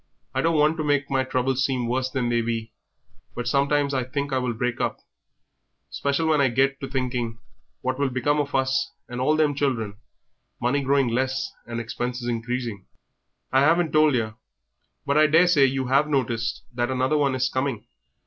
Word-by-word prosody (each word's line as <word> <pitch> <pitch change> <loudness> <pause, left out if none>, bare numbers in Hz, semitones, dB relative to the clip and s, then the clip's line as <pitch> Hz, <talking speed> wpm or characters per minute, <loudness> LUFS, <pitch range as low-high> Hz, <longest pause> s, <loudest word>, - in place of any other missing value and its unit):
I - - +1
don't 165 -1 +2
want 150 +2 +3
to 155 - -1
make 145 -2 0
my 135 -1 +2
troubles 130 0 0
seem 130 -2 0
worse 130 +2 0
than 130 -3 -1
they 120 0 +2
be, 115 -1 -3 0.6
but 120 0 -4
sometimes 140 +2 +2
I 130 -2 0
think 140 +2 -3
I 130 - +2
will 125 -2 -2
break 125 +1 -2
up, - - -1 0.9
'special 140 +3 0
when 155 -2 +3
I 135 - +4
get 135 +3 +1
to 135 - -5
thinking 125 -4 -2 0.4
what 130 +1 -2
will 140 -1 +1
become 130 +4 0
of 145 -1 -2
us 130 0 +1
and 120 +1 -5
all 150 +4 +3
them 155 -2 +2
children, 120 -8 -1 0.6
money 125 +4 +1
growing 135 -1 +2
less 130 +3 -1 0.2
and 115 0 -4
expenses 120 +1 -4
increasing. 115 -3 -3 0.7
I 135 - +5
haven't 160 +3 +3
told 155 -2 +4
yer, 110 -2 -1 0.7
but 140 +2 +2
I 155 - +6
daresay 165 -2 +5
you 135 0 0
have 135 +4 +3
noticed 120 -5 -1
that 120 +1 -1
another 130 +3 +1
one 140 -2 +2
is 130 0 +1
coming. 130 -4 -2
130 Hz, 185 wpm, -24 LUFS, 120-140 Hz, 0.9 s, I